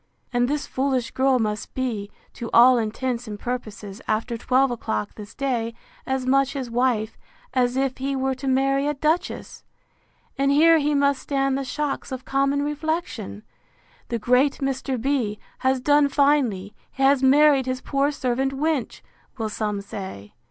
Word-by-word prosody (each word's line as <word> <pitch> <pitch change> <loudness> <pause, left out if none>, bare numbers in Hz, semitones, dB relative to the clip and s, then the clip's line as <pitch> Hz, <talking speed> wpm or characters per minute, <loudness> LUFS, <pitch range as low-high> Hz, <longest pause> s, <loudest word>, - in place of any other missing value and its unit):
And 245 0 +2
this 295 +2 -1
foolish 260 -2 -1
girl 265 0 +2
must 210 -3 -3
be, 230 -6 -2 0.2
to 235 - -6
all 245 +1 +7
intents 235 +2 -2
and 210 -1 -6
purposes, 215 -4 -6
after 225 +2 -1
twelve 255 +3 +2
o'clock 105 - -3
this 210 +1 -11
day, 235 -4 -2 0.3
as 265 -1 -1
much 270 +1 +2
his 260 -4 -5
wife, 235 -3 0 0.3
as 250 0 +1
if 265 -1 -1
he 275 +1 -1
were 265 0 0
to 265 +1 -6
marry 275 +2 +2
a 295 - 0
duchess!—And 300 -2 -4
here 325 +3 +6
he 295 0 +1
must 280 -1 +2
stand 275 -1 0
the 275 - -2
shocks 285 +1 -3
of 260 0 -6
common 275 +1 +1
reflection! 295 - -3 0.6
The 235 - -2
great 250 +5 +3
Mr. 270 -1 -2
B—— 240 -5 0 0.2
has 260 0 +1
done 290 +2 +4
finely! 270 -9 +2 0.2
he 270 - -3
has 270 0 +5
married 275 0 +5
his 255 0 -1
poor 280 +1 0
servant 265 -1 -1
wench! 295 -2 -1 0.4
will 220 -2 -2
some 210 -1 -2
say. 190 - -8
260 Hz, 160 wpm, -24 LUFS, 235-275 Hz, 0.6 s, all